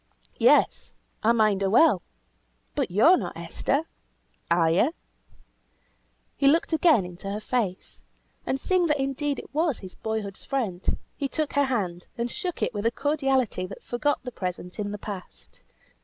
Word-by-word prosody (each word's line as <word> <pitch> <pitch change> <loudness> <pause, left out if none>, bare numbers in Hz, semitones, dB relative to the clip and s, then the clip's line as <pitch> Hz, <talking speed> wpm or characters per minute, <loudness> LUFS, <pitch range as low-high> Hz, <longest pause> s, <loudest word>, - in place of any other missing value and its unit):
"Yes, - - +3 0.3
I 225 - +4
mind 215 -4 +3
her 195 - +2
well! 225 - +5 0.7
But - - -1
yo 210 - +5
are 370 - +6
not - - -5
Esther, 280 +3 -1 0.7
are 170 -1 +4
you?" 245 - +2 1.4
He 275 - +2
looked 325 +3 +3
again 310 - +4
into 180 +2 -8
her 205 +1 -3
face, 215 -5 -3 0.4
and 265 - -1
seeing 365 +2 +2
that 300 -2 +1
indeed 275 +1 -1
it - - -10
was 310 -3 +1
his 185 -2 -10
boyhood's 220 -3 -4
friend, 220 -10 -2 0.2
he 280 - -2
took 305 +1 -2
her 285 0 +3
hand, 185 -9 -2
and 235 0 -2
shook 365 -5 -3
it - - 0
with 205 +1 0
a - - +2
cordiality 270 -9 0
that 195 - -10
forgot 290 +4 -1
the 250 - -5
present 180 -2 -5
in 205 -1 -2
the 210 - -4
past. 200 -3 -9
235 Hz, 165 wpm, -26 LUFS, 195-285 Hz, 1.4 s, are